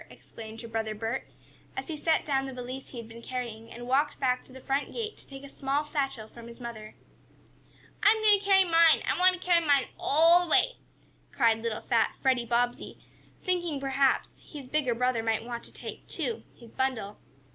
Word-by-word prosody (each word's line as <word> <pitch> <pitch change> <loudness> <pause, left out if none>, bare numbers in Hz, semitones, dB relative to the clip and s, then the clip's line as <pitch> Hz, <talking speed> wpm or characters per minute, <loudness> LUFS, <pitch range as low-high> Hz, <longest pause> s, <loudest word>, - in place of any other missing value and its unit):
exclaimed 220 0 -11
her 230 - -8
brother 220 -1 -3
Bert, 225 +4 -3 0.5
as - - -4
he 320 - -4
set 320 +2 +1
down 270 -2 0
the 265 - -6
valise 255 +1 -7
he 255 - -10
had 230 -1 -7
been 230 +1 -11
carrying, 235 -2 -6
and 240 +1 -8
walked 280 +4 +1
back 250 -2 +1
to - - -18
the 260 - -11
front 270 +2 -1
gate 445 -2 -4
to - - -13
take 270 0 -10
a - - -8
small 275 +1 -1
satchel 275 -7 -3
from 235 +1 -12
his 235 +1 -12
mother. 225 -3 -8 1.1
"I'm 435 +1 +5
going 420 -2 +6
to - - -12
carry 390 -1 +5
mine! 330 -2 +5
I - - +2
want 370 0 +6
to 365 - -6
carry 350 -2 +3
mine 285 -3 +3
all 335 +4 +5
the - - -10
way!" - - +4 0.5
cried 230 -3 +3
little 230 -1 -3
fat 230 -1 +1
Freddie 255 -3 +1
Bobbsey, 240 +1 -1 0.5
thinking 345 -5 -1
perhaps 270 0 +1
his 290 -4 -10
bigger 255 -3 0
brother 250 -1 +1
might 225 0 -1
want 235 -1 -5
to - - -13
take, - - -9
too, 455 - -3
his 235 -2 -15
bundle. 245 -6 -2
265 Hz, 200 wpm, -28 LUFS, 235-305 Hz, 1.1 s, going